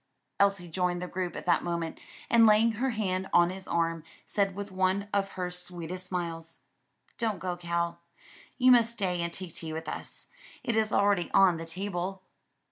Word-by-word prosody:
Elsie 195 Hz, -3 st, +3 dB
joined 175 Hz, +1 st, 0 dB
the 180 Hz, -, -4 dB
group 180 Hz, -1 st, -3 dB
at -, -, -6 dB
that 180 Hz, -, +3 dB
moment 170 Hz, -2 st, -3 dB, 0.3 s
and 230 Hz, -1 st, +6 dB
laying 215 Hz, +2 st, +5 dB
her 245 Hz, +4 st, -1 dB
hand 190 Hz, -5 st, -1 dB
on 175 Hz, 0 st, +5 dB
his 190 Hz, 0 st, -8 dB
arm, 165 Hz, -1 st, 0 dB, 0.2 s
said 195 Hz, -2 st, 0 dB
with 200 Hz, 0 st, -6 dB
one 190 Hz, +2 st, +1 dB
of 195 Hz, -1 st, 0 dB
her 180 Hz, -1 st, -3 dB
sweetest 180 Hz, 0 st, -3 dB
smiles, 165 Hz, -3 st, -4 dB, 0.6 s
"Don't 220 Hz, -4 st, 0 dB
go, 180 Hz, 0 st, -3 dB
Cal, 170 Hz, -1 st, -2 dB, 0.6 s
you 255 Hz, 0 st, +6 dB
must 235 Hz, -2 st, +5 dB
stay 185 Hz, -6 st, -1 dB
and 170 Hz, 0 st, -2 dB
take 180 Hz, -1 st, -7 dB
tea 160 Hz, -1 st, -3 dB
with 160 Hz, +1 st, -5 dB
us; -, -, -5 dB, 0.4 s
it 235 Hz, -, 0 dB
is 220 Hz, -1 st, +2 dB
already 200 Hz, -4 st, +2 dB
on 190 Hz, -3 st, +6 dB
the 165 Hz, 0 st, -7 dB
table." 190 Hz, +1 st, -3 dB
185 Hz, 180 wpm, -29 LUFS, 170-200 Hz, 0.6 s, and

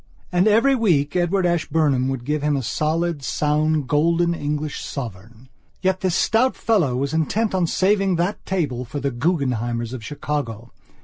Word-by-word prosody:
And 180 Hz, +3 st, +3 dB
every 230 Hz, +6 st, +4 dB
week 170 Hz, -, +1 dB
Edward 180 Hz, +1 st, +1 dB
Ashburnham 155 Hz, -6 st, +1 dB
would 135 Hz, -3 st, -3 dB
give 150 Hz, +1 st, -1 dB
him 150 Hz, -1 st, +1 dB
a 135 Hz, -, -3 dB
solid, 160 Hz, +4 st, -1 dB
sound, 150 Hz, +2 st, 0 dB
golden 170 Hz, +4 st, +2 dB
English 150 Hz, -1 st, -3 dB
sovereign. 115 Hz, -1 st, -8 dB, 0.4 s
Yet 190 Hz, 0 st, +1 dB
this 185 Hz, -3 st, 0 dB
stout 235 Hz, +6 st, +2 dB
fellow 175 Hz, -, +1 dB
was 140 Hz, +4 st, -2 dB
intent 200 Hz, +8 st, 0 dB
on 180 Hz, -3 st, +1 dB
saving 195 Hz, +2 st, +2 dB
that 175 Hz, +4 st, -1 dB
table 145 Hz, -10 st, -2 dB
for 135 Hz, +4 st, -5 dB
the 140 Hz, 0 st, -1 dB
Guggenheimers 120 Hz, -5 st, -1 dB
of 125 Hz, -3 st, -6 dB
Chicago. 120 Hz, -5 st, -4 dB
150 Hz, 160 wpm, -22 LUFS, 135-180 Hz, 0.4 s, every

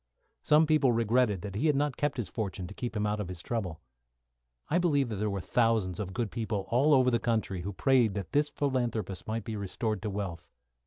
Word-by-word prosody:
Some 150 Hz, +1 st, +5 dB
people 150 Hz, -4 st, +3 dB
regretted 115 Hz, -4 st, +2 dB
that 100 Hz, -, -5 dB
he 125 Hz, +11 st, 0 dB
had 150 Hz, -, +3 dB
not 145 Hz, -1 st, 0 dB
kept 145 Hz, -1 st, -1 dB
his 120 Hz, -6 st, -2 dB
fortune 95 Hz, -1 st, -4 dB
to 90 Hz, -, -8 dB
help 120 Hz, -2 st, -3 dB
him 105 Hz, 0 st, 0 dB
out 105 Hz, 0 st, -1 dB
of 105 Hz, -, -3 dB
his 90 Hz, -1 st, -7 dB
trouble. 95 Hz, -8 st, -3 dB, 0.9 s
I 175 Hz, -, +2 dB
believe 145 Hz, -7 st, +2 dB
there 105 Hz, 0 st, -1 dB
were 100 Hz, -1 st, -2 dB
thousands 110 Hz, -5 st, +1 dB
of 95 Hz, -3 st, -3 dB
good 120 Hz, -4 st, -1 dB
people 110 Hz, -4 st, -2 dB
all 140 Hz, +5 st, +4 dB
over 130 Hz, -1 st, +4 dB
the 120 Hz, -, +2 dB
country 110 Hz, -6 st, -1 dB
who 100 Hz, +3 st, -4 dB
prayed 120 Hz, 0 st, +3 dB
that 100 Hz, -4 st, -4 dB
this 145 Hz, +1 st, +2 dB
philanthropist 120 Hz, -9 st, -2 dB
might 110 Hz, 0 st, -2 dB
be 110 Hz, -, -5 dB
restored 105 Hz, +1 st, -2 dB
to 105 Hz, -, -3 dB
wealth. 95 Hz, -5 st, -5 dB
110 Hz, 215 wpm, -30 LUFS, 100-130 Hz, 0.9 s, Some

